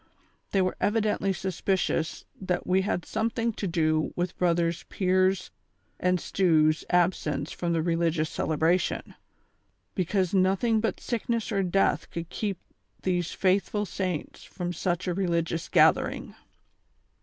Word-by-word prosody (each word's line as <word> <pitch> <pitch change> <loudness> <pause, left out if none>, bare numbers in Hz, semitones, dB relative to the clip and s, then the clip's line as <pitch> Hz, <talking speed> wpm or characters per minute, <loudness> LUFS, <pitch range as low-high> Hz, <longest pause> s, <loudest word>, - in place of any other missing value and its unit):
They 195 -2 +2
were 185 - -1
evidently 210 -2 +1
suspicious 185 -3 -1 0.2
that 185 -2 -1
we 185 +1 +3
had 185 -3 -2
something 230 +1 -1
to 205 - -3
do 155 -2 +1
with 175 +1 -2
brothers 170 -1 +1
Pier's 185 - +1 0.5
and 180 0 +2
Stew's 155 -4 +2
absence 165 -5 +1
from 170 -1 -2
the 165 -1 +1
religious 165 -2 +1
celebration; 160 +4 0 0.8
because 185 0 0
notliing 195 +4 +3
but 225 - -1
sickness 235 -1 -2
or 200 -2 +1
death 195 +1 +1
could 170 0 -6
keep 200 -1 -3 0.5
these 175 -2 0
faithful 200 +2 +1
saints 185 -5 -4
from 175 -1 -5
such 175 +1 -2
a 180 - +1
religious 170 -3 -1
gathering. - - +3
180 Hz, 125 wpm, -27 LUFS, 170-195 Hz, 0.8 s, we